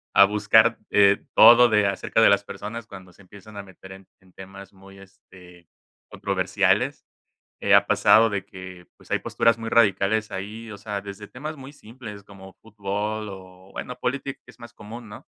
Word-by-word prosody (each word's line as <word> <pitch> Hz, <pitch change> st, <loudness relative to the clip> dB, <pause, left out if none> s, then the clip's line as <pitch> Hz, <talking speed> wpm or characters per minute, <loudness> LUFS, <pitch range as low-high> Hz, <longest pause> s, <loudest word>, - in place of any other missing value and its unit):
a 100 Hz, -, +8 dB
buscar, 105 Hz, +3 st, +3 dB
eh, 100 Hz, -1 st, +3 dB
todo 120 Hz, +1 st, +8 dB
de 105 Hz, -2 st, +2 dB
acerca 100 Hz, +3 st, -1 dB
de -, -, +6 dB
las 100 Hz, 0 st, +2 dB
personas 115 Hz, +3 st, -8 dB
cuando 95 Hz, -4 st, -13 dB
se 95 Hz, -, -20 dB
empiezan 100 Hz, +2 st, -15 dB
a 100 Hz, -, -7 dB
meter 95 Hz, 0 st, -15 dB
en 95 Hz, 0 st, -14 dB
en 95 Hz, -1 st, -24 dB
temas 95 Hz, 0 st, -13 dB
muy, 95 Hz, 0 st, -17 dB
este, 90 Hz, -3 st, -18 dB, 0.4 s
controversiales, -, -, -1 dB, 0.6 s
eh, -, -, +3 dB
ha -, -, +5 dB
pasado 115 Hz, +1 st, +4 dB
de 100 Hz, -3 st, -4 dB
que, 95 Hz, -2 st, -12 dB
pues, -, -, -21 dB
hay -, -, 0 dB
posturas 115 Hz, 0 st, +1 dB
muy 115 Hz, 0 st, -7 dB
radicales 105 Hz, -1 st, +1 dB
ahí, 105 Hz, +4 st, -7 dB
o -, -, -9 dB
sea, 105 Hz, -1 st, -5 dB
desde 100 Hz, +1 st, -10 dB
temas 150 Hz, +5 st, -8 dB
muy 135 Hz, +1 st, -12 dB
simples 110 Hz, -6 st, -12 dB
como 95 Hz, -1 st, -15 dB
fútbol 105 Hz, 0 st, -5 dB
o, 95 Hz, 0 st, -14 dB
bueno, 125 Hz, -, -7 dB
política 135 Hz, +2 st, -4 dB
es 125 Hz, -, -18 dB
más 120 Hz, -2 st, -13 dB
común, 115 Hz, +2 st, -11 dB
¿no? 105 Hz, -, -13 dB
100 Hz, 180 wpm, -23 LUFS, 95-110 Hz, 0.6 s, a